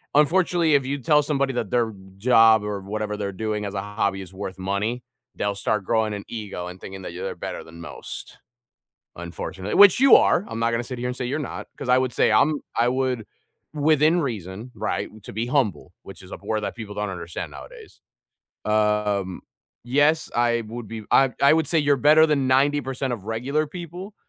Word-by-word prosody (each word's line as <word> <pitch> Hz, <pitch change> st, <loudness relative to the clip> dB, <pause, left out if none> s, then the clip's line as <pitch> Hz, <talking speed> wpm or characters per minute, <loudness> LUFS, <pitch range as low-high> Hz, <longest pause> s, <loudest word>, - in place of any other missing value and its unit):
unfortunately, 165 Hz, 0 st, +3 dB
if 135 Hz, -2 st, +2 dB
you 140 Hz, +1 st, -2 dB
tell 150 Hz, +4 st, +4 dB
somebody 140 Hz, -2 st, 0 dB
that 115 Hz, -5 st, -2 dB
their 115 Hz, -2 st, +1 dB, 0.3 s
job 115 Hz, -1 st, +5 dB
or 105 Hz, -1 st, -3 dB
whatever 105 Hz, +1 st, -4 dB
they're 100 Hz, -1 st, -3 dB
doing 105 Hz, +1 st, -3 dB
as 100 Hz, -, -5 dB
a 95 Hz, -, -1 dB
hobby 100 Hz, -1 st, -2 dB
is 95 Hz, 0 st, -11 dB
worth 95 Hz, -1 st, -6 dB
money, 105 Hz, +6 st, -2 dB, 0.3 s
they'll 100 Hz, 0 st, -1 dB
start 105 Hz, 0 st, -1 dB
growing 110 Hz, -2 st, +1 dB
an 100 Hz, -, -5 dB
ego 100 Hz, -6 st, -5 dB
and 90 Hz, +1 st, -9 dB
thinking 95 Hz, 0 st, -8 dB
they're 90 Hz, +2 st, -5 dB
better -, -, -6 dB
than 85 Hz, +1 st, -13 dB
most. -, -, -8 dB, 0.8 s
Unfortunate 90 Hz, +3 st, -5 dB
which 205 Hz, +3 st, +8 dB
you 270 Hz, -1 st, +8 dB
are, 190 Hz, -, +4 dB
I'm 115 Hz, -, -5 dB
not 115 Hz, 0 st, +1 dB
gonna 115 Hz, +1 st, -1 dB
sit 125 Hz, -1 st, -7 dB
here 125 Hz, -, -2 dB
and 125 Hz, -, -4 dB
say 125 Hz, -, -3 dB
you're 140 Hz, +5 st, -2 dB
not 145 Hz, -, -6 dB
'cause -, -, -6 dB
I 125 Hz, -, +6 dB
would 130 Hz, -1 st, 0 dB
say -, -, +3 dB
I'm 150 Hz, 0 st, +3 dB, 0.2 s
I 120 Hz, +1 st, +3 dB
would, 130 Hz, -3 st, -1 dB, 0.5 s
within 155 Hz, +3 st, +3 dB
reason, 110 Hz, -, -5 dB
right, -, -, -2 dB
to -, -, -9 dB
be 110 Hz, +3 st, -2 dB
humble, 120 Hz, -, 0 dB
which 95 Hz, -, -11 dB
is 95 Hz, -, -14 dB
a -, -, -6 dB
word 110 Hz, +1 st, -1 dB
that -, -, -4 dB
people 110 Hz, -3 st, -7 dB
don't 105 Hz, -1 st, -2 dB
understand 85 Hz, -2 st, -6 dB
nowadays. 470 Hz, -4 st, -13 dB, 0.6 s
Um, 105 Hz, -3 st, 0 dB, 0.4 s
yes, 145 Hz, +5 st, +2 dB
I 120 Hz, -1 st, +2 dB
would 115 Hz, -2 st, -7 dB
be 110 Hz, -2 st, -7 dB
I 135 Hz, -1 st, +5 dB
I 140 Hz, -, +7 dB
would 160 Hz, -1 st, +1 dB
say 165 Hz, -, +2 dB
you're 145 Hz, -1 st, +3 dB
better 155 Hz, +4 st, +6 dB
than 140 Hz, -4 st, +1 dB
90% 135 Hz, -1 st, +1 dB
of 100 Hz, -4 st, -11 dB
regular 130 Hz, +8 st, -1 dB
people, 175 Hz, +5 st, -8 dB
115 Hz, 200 wpm, -24 LUFS, 105-145 Hz, 0.8 s, which